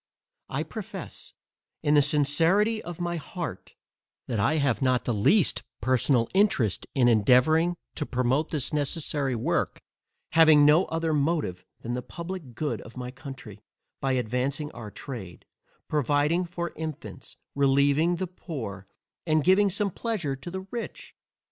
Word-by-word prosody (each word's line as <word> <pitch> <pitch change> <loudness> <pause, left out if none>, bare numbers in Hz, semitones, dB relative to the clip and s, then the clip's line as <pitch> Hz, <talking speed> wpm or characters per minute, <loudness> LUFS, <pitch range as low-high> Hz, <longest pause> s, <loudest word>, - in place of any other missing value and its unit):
I - - -1
profess - - -8 0.5
in 150 -1 +3
the 145 - +7
sincerity 165 +11 +2
of 175 -1 -8
my 175 0 -2
heart, 165 - -6 0.5
that 115 -4 -2
I 150 +10 +2
have 140 -5 +1
not 130 -2 +2
the 120 - 0
least 155 - +3 0.2
personal 125 0 +2
interest 190 - +2
in 125 -3 +4
endeavouring 130 +10 +4 0.2
to 150 - -4
promote 130 +5 +1
this 150 -1 -3
necessary 145 -2 -1
work, 115 - -1 0.5
having 155 -3 +7
no 155 +5 +6
other 165 -1 -1
motive 145 - 0 0.2
than 120 - -4
the 125 - -2
publick 170 -4 -7
good 150 +4 -2
of 115 - -13
my 125 0 -5
country, 130 -6 -10 0.4
by 135 -1 0
advancing 130 +5 -1
our 110 - -8
trade, 105 -6 -8 0.4
providing 150 +4 +1
for 170 0 -5
infants, 160 -2 -7 0.2
relieving 140 +4 +3
the 185 +2 -2
poor, 120 - -7 0.4
and 155 -1 +3
giving 195 +4 +5
some 200 +1 -1
pleasure 180 - -2
to 135 +6 -8
the 190 +2 -5
rich. 235 -2 -6
145 Hz, 140 wpm, -27 LUFS, 125-170 Hz, 0.5 s, the